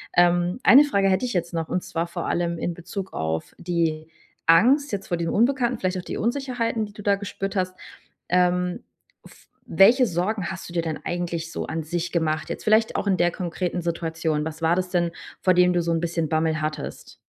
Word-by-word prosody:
Ähm, 175 +3 +3
1 275 +3 +8
Frage 200 -9 +1
hätte 190 +7 +1
ich 245 - -3
jetzt 170 -1 -2
noch 165 -1 -2
und 180 - -2
zwar 165 +1 -2
vor 170 - -5
allem 170 -1 -1
in 175 - -2
Bezug 190 +3 -7
auf 80 0 -3
die 165 -3 -1 0.4
Angst 255 - +5
jetzt 200 -2 -4
vor 175 - -1
diesem 165 0 -2
Unbekannten, 245 +1 +2
vielleicht 185 0 -1
auch 180 - -5
die - - -5
Unsicherheiten, 235 -2 -1
die 205 - -13
du 210 - -10
da 200 0 +3
gespürt 195 0 -5
hast. 185 -1 -1 0.5
Ähm, 180 0 +1 0.4
f - - -18 0.2
welche 240 +7 +6
Sorgen 180 +1 -1
hast 185 -2 -7
du - - -10
dir 170 - +1
denn 160 -2 -3
eigentlich 170 -2 -3
so - - -4
an 160 0 -4
sich 170 +2 -3
gemacht, 155 -3 0
jetzt - - -5
vielleicht 220 +1 +3
auch - - -1
in 190 -2 +2
der 175 -1 +2
konkreten 175 0 -3
Situation? 160 -2 -2
Was 160 0 -6
war 165 +2 +2
das 185 -1 -1
denn, 175 -2 +1 0.3
vor 185 - +4
dem 180 0 +4
du 175 - +2
so 170 - -1
'n 165 - +1
bisschen 165 -2 -2
Bammel 160 0 0
hattest? 155 -1 -5
175 Hz, 210 wpm, -24 LUFS, 165-195 Hz, 0.5 s, 1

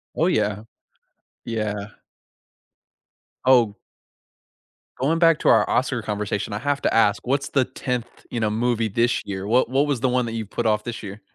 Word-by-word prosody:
Oh, 165 - +2
yeah. 105 - 0 0.8
Yeah. 105 -2 -4 1.5
Oh 120 -5 +4 1.2
going 160 +5 +1
back 165 -2 +5
to - - +2
our 110 -2 +5
Oscar 125 -2 0
conversation, 105 -1 -3
I - - -2
have 145 +3 -1
to - - +1
ask: 105 -1 +3
What's 140 +2 0
the 130 -3 +2
10th, 125 -2 -3 0.2
you 120 - -2
know, 110 -1 +1
movie 115 +1 0
this 115 +3 +1
year? 95 -1 -5
What 120 +4 +2
what 135 +3 +2
was 145 -4 -1
the 130 +2 +1
one 125 -1 +1
that 115 - -4
you've 110 -3 -4
put 120 - -3
off 105 -1 +2
this 120 -1 -6
year? 100 +1 -8
115 Hz, 175 wpm, -23 LUFS, 105-130 Hz, 1.5 s, back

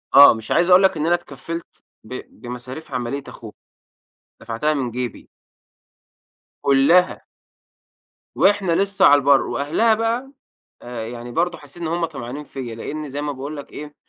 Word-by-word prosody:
آه، 140 +1 +10
مش 110 -1 -8
عايز 175 +2 +3
أقول 185 +1 +7
لك 190 -3 +3
إن 150 - -1
أنا 175 +1 +4
اتكفلت 170 -1 -7 0.4
ب 110 - -10 0.3
بمصاريف 125 +5 -8
عمليّة 125 +2 -3
أخوها 110 -2 -10 0.9
دفعتها 115 +7 -1
من 130 -5 -2
جيبي. 125 0 -5 1.3
كُلّها. 140 +7 +3 1.1
وإحنا 200 -3 +3
لسّه 195 +2 +2
على 145 - +8
البّر، 140 -1 +4
وأهلها 190 +11 +1
بقى 230 +4 -1 0.8
يعني 120 0 -8
برضو 175 +5 0
حسّيت 145 +4 -13
إن 160 - -1
هم 170 +1 0
طمعانين 145 -2 -7
فيَّ، 125 -5 -7
لأني 150 +5 -6
زي 145 +2 -4
ما 150 -1 -2
باقول 140 +3 -6
لك 145 - -9
إيه، 150 0 -9
145 Hz, 150 wpm, -21 LUFS, 130-175 Hz, 1.3 s, آه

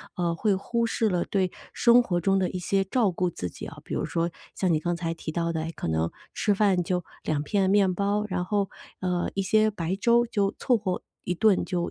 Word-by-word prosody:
呃， 170 -2 0
会 200 +3 +1
忽 235 +4 -1
视 225 -1 +1
了 175 -2 +1
对 190 -3 0 0.2
生 240 +1 +6
活 175 -7 -1
中 195 +3 +2
的 185 - +1
一 185 - -4
些 195 +2 +1
照 205 0 +1
顾 180 +1 0
自 90 - -5
己 - - -8
啊， - - -11
比 - - -7
如 - - -1
说 170 0 -1 0.2
像 185 -3 +1
你 155 - +2
刚 175 +2 -1
才 165 -1 -2
提 165 -1 -6
到 170 0 -1
的， 160 - -1
哎， 165 - -4
可 - - -4
能 80 +1 0 0.2
吃 205 -2 +1
饭 195 -3 +3
就 180 0 -1 0.2
2 150 -2 -1
片 195 +2 +1
面 195 -2 +4
包， 205 +2 0
然 180 -2 -1
后， 200 -1 0 0.3
呃， 180 -1 0
一 195 - +1
些 215 +2 +3
白 185 -3 -2
粥 235 +3 +4
就 205 -4 0
凑 250 - +2
合 190 -4 -2 0.2
一 180 - -2
顿 210 0 +3
就 175 -2 -1
185 Hz, 245 characters per minute, -26 LUFS, 175-205 Hz, 0.3 s, 生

